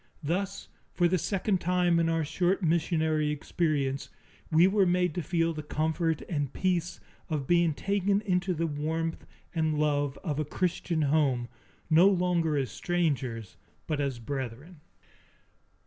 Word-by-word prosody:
Thus, 190 +6 -2 0.3
for 175 - +4
the 180 +1 +1
second 190 +1 0
time 180 -1 +2
in 165 0 +2
our 165 -1 0
short 180 +5 0
missionary 160 -2 +1
experience, 145 -2 -1 0.4
we 160 +2 +6
were 195 0 +3
made 180 -2 +2
to 175 - -2
feel 165 +1 0
the 155 - -5
comfort 160 +2 -1
and 145 -6 -2
peace 180 -2 -1 0.3
of 150 -4 -2
being 170 -1 +3
taken 200 +2 +1
into 180 -2 0
the 165 +1 0
warmth 160 +2 -3 0.3
and 160 -2 0
love 145 -2 0
of 155 -5 -2
a - - +1
Christian 165 0 -1
home, 135 -5 +1 0.4
no 165 +4 +6
longer 175 -5 +1
as 135 -2 -1
strangers, 130 - -2 0.3
but 150 -2 -1
as 135 -3 -1
brethren. 135 +6 -6
165 Hz, 145 wpm, -29 LUFS, 150-180 Hz, 0.4 s, we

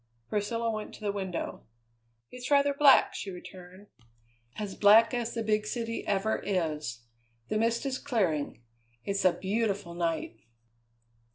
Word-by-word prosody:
Priscilla 230 +2 -1
went 215 -1 -5
to - - -15
the 205 -1 -1
window. 190 -3 -4 0.7
"It's 250 0 -7
rather 285 0 +4
black," 280 -1 +6
she 200 - -5
returned; 185 +1 -11 0.7
"as 205 -2 -4
black 215 +5 +6
as 240 -1 -2
the 230 - -1
big 210 -1 +1
city 230 0 -3
ever 205 +2 +1
is. 155 - -2 0.5
The 215 - 0
mist 230 +3 +1
is 265 -1 -2
clearing; 175 - -1 0.4
it's 200 -1 -1
a 185 - +7
beautiful 195 -1 -2
night." 165 -9 -2
210 Hz, 140 wpm, -29 LUFS, 185-230 Hz, 0.7 s, a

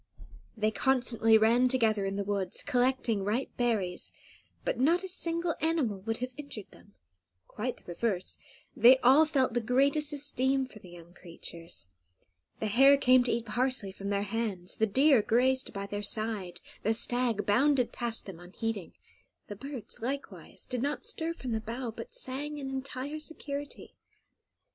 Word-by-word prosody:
They 215 0 +1
constantly 235 -2 +3
ran 230 +3 +4
together 225 -6 +2
in 195 - -3
the 200 - -1
woods, 195 -2 -1
collecting 250 -5 +1
ripe 220 +7 -2
berries; 215 -7 -1 0.5
but - - -1
not 335 +8 +3
a - - -4
single 335 -2 0
animal 300 -11 0
would 225 +3 -3
have 255 - -15
injured 280 -9 -8
them; 205 - -19 0.5
quite 245 +4 -4
the - - -23
reverse, 185 +1 -2 0.4
they 250 +3 +7
all 275 +6 +6
felt 265 -5 +1
the 240 - +1
greatest 280 +6 +2
esteem 270 -2 0
for 225 -4 -13
the 185 - -14
young 175 0 -13
creatures. 170 - -10 0.7
The - - -2
hare 270 +7 +6
came 255 -2 +5
to 240 - +1
eat 230 0 -1
parsley 235 -2 -1
from 200 +1 -6
their 200 0 0
hands, 205 -4 -3
the 220 - +2
deer 265 +3 +5
grazed 255 +4 +2
by 200 -1 -5
their 205 +1 -4
side, 205 -5 0 0.2
the 220 +1 +1
stag 235 -2 +1
bounded 260 +4 +3
past 235 -2 -3
them 185 -4 -9
unheeding; 195 +2 -5 0.6
the 205 - -5
birds, 265 0 -7
likewise, 275 +4 -5
did 250 -2 -3
not 290 +2 -2
stir 325 +1 0
from 255 -6 -6
the 220 -1 -1
bough, 235 +2 -5
but 485 0 -8
sang 295 - -3
in 270 -2 -5
entire 270 +2 -4
security. 290 -2 -7
240 Hz, 160 wpm, -30 LUFS, 205-270 Hz, 0.7 s, they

